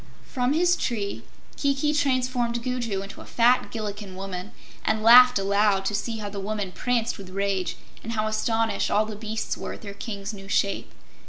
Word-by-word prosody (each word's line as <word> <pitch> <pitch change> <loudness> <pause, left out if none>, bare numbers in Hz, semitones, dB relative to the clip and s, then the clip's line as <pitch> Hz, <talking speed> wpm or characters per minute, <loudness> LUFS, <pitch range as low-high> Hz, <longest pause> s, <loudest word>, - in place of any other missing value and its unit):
From 250 0 0
his 350 +3 +3
tree 215 - -2 0.4
Kiki 280 +1 +1
transformed 255 -4 0
Gugu 240 -6 -2
into 195 - -10
a - - -11
fat 245 +2 +3
Gillikin 205 -3 -5
woman, 190 0 -6 0.3
and 220 0 0
laughed 250 +1 +9
aloud 200 0 +2
to 205 - 0
see 225 +3 -2
how 210 -1 -5
the 200 0 -5
woman 205 -1 -3
pranced 235 +1 -1
with 190 -2 -9
rage, 195 -1 -1 0.2
and 230 - -5
how 215 -1 0
astonished 225 +1 0
all 215 +1 +3
the 215 -1 -6
beasts 220 +1 -3
were - - -5
at - - -11
their 200 -1 -6
King's 200 -1 -6
new 195 -1 -10
shape. 200 0 0
215 Hz, 180 wpm, -25 LUFS, 200-245 Hz, 0.4 s, laughed